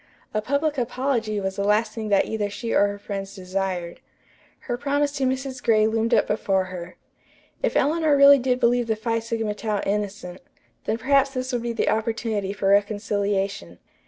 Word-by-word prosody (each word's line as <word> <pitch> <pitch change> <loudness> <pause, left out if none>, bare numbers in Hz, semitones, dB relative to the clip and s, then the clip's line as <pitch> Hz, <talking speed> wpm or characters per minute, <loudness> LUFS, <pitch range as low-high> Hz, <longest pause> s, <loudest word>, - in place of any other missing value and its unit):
A 215 - 0
public 285 +4 0
apology 240 -3 -1
was 190 -1 -3
the 200 - -1
last 210 +3 +2
thing 220 -2 -5
that 200 -1 +3
either 210 -2 -2
she 230 +3 -4
or 205 - +4
her 205 0 -5
friends 200 -1 -6
desired. 185 -2 -3 0.6
Her 245 - -3
promise 285 +2 0
to 275 -2 -1
Mrs. 260 0 -3
Gray 215 -3 +3
loomed 225 +1 0
up - - +3
before 195 -3 0
her. 175 -1 -8 0.7
If - - +1
Eleanor 310 -1 +2
really 280 0 +8
did 250 0 0
believe 240 0 +2
the 220 - +1
Phi 230 +1 -1
Sigma 225 -2 -2
Tau 210 -1 -2
innocent, 200 -3 -3 0.4
then 220 - 0
perhaps 275 +3 +3
this 255 +1 -3
would 245 - 0
be 235 0 -2
the - - 0
opportunity 220 -2 -1
for 200 -1 -1
reconciliation. 200 - 0
220 Hz, 180 wpm, -24 LUFS, 200-250 Hz, 0.7 s, really